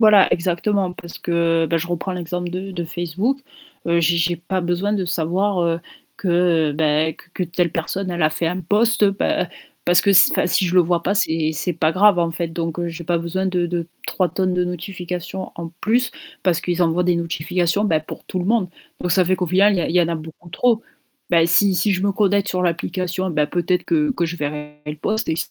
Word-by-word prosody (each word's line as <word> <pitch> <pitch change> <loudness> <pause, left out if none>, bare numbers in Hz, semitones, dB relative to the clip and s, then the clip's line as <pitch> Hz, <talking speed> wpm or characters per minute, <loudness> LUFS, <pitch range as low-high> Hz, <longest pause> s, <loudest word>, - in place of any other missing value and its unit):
Voilà, 215 -3 +6
exactement 180 +2 0
parce 170 -1 -10
que, 165 -1 +1
bah, 165 - 0
je 165 +1 -2
reprends 175 +2 -3
l'exemple 175 0 -4
de 190 +2 -5
de 175 -1 -3
Facebook, 175 - -2 0.5
heu, 170 0 +3
j'ai 170 +1 +3
j'ai 170 +1 +1
pas 185 +3 -3
besoin 175 +4 -1
de 195 -3 0
savoir, 180 +3 0
heu, 170 0 0 0.4
que 170 -4 +2
beh, 155 +1 +1
q - - -18
que 185 - -3
telle 175 0 0
personne, 185 +4 -3
elle 175 -1 -2
a 155 - +5
fait 165 +1 -1
un 180 +2 -3
post 215 +5 +2
bah, 195 0 +1 0.4
parce 175 0 +5
que 200 - +3
si 195 - +7
enfin - - +2
si 185 - +2
je 175 - -2
le 185 - +7
vois 175 0 +1
pas, 200 - +1
c'est 160 -6 +1
c'est 170 +4 -2
pas 160 0 +1
grave 200 0 +5
en 170 -1 +1
fait, 170 0 -2
donc 165 0 -3
heu, 175 - -1
j'ai 170 0 -7
pas 170 +1 +1
besoin 175 +3 -2
de 180 -2 0
de 170 -1 -3 0.2
3 185 -2 +1
tonnes 185 0 -1
de 180 0 +1
notification 180 +1 -5
en 170 -1 -6
plus 245 +4 +1 0.3
parce 175 -3 +2
qu'ils 175 0 0
envoient 170 +1 +2
des 180 0 +3
notifications 170 +3 0
bah 160 -7 +2
pour 155 - -10
tout 185 - -3
le 180 - -3
monde, 215 -3 +2 0.3
donc 180 - 0
ça 185 +1 +4
fait 185 +2 +1
qu'au 180 - -1
final 195 +4 +4
il - - 0
y - - +1
a - - -1
il 165 - -3
y 180 - +5
en 165 - 0
a 170 - -1
beaucoup 160 +2 -11
trop. 230 +4 +2 0.5
Bah 165 -1 +5
si 185 +3 +4
si 205 +3 +2
je 185 -1 -1
me 200 - +2
connecte 200 0 +1
sur 180 0 -1
l'application, 180 +2 -2
ben 150 -2 +1
peut-être 175 +3 0
que 305 -3 +1
que 175 -10 0
je 165 - -4
verrai 150 -1 -5
le 150 0 -4
post 215 +9 -2
et 160 - 0
175 Hz, 235 wpm, -21 LUFS, 165-190 Hz, 0.5 s, si